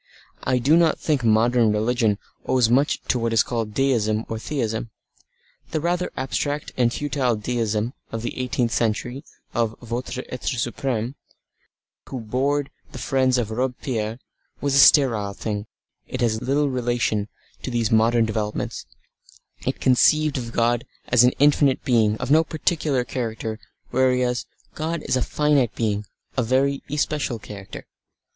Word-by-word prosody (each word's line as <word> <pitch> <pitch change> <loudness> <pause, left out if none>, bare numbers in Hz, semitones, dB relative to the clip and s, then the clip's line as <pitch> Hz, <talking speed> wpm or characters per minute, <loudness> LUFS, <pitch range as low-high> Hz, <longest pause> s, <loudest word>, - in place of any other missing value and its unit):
I 130 0 +1
do 135 +6 +4
not 165 -2 +4
think 145 -5 0
modern 115 +1 +4
religion 110 0 +1 0.3
owes 125 -3 +3
much 140 +4 +2
to 125 - 0
what 115 0 0
is 115 - +5
called 115 -3 -3
Deism 115 -5 +1
or 110 - -4
Theism. 115 -4 -2 0.8
The 155 - -1
rather 175 +3 -1
abstract 145 +2 -2
and 120 -2 +2
futile 135 -3 0
Deism 110 +1 -1 0.2
of 115 0 -4
the - - -3
eighteenth 125 -2 0
century, 120 +4 -1 0.3
of 115 -2 0
"votre 125 +2 -4
Etre 125 +1 -2
supreme" 120 0 -2 1.0
who 130 - -4
bored 135 +5 -1 0.2
the 140 - -8
friends 130 0 +2
of 115 -3 -1
Robespierre, 120 -2 -2 0.4
was 140 -1 -1
a 140 - +5
sterile 115 -9 +5
thing, 105 0 -4 0.4
it 130 - -5
has 110 -2 +1
little 140 +2 +1
relation 120 -4 0 0.3
to - - -4
these 120 -3 0
modern 115 +1 +4
developments, 110 -1 -3 0.8
it - - -1
conceived 150 +4 +4
of 120 -3 -4
God 120 +1 +1 0.3
as 125 -1 +6
an 125 - +4
infinite 145 -1 +3
Being 110 -4 +3
of 125 +3 -3
no 160 +2 +6
particular 155 -4 0
character 115 -2 -4 0.3
whereas 125 -1 +1 0.3
God 160 +1 -3
is - - 0
a 130 - +1
finite 145 -4 +1
being 105 -2 -1 0.3
of 125 - +2
a - - -9
very 135 +2 +2
especial 145 -3 -1
character. 100 -2 -9
125 Hz, 150 wpm, -23 LUFS, 115-135 Hz, 1.0 s, as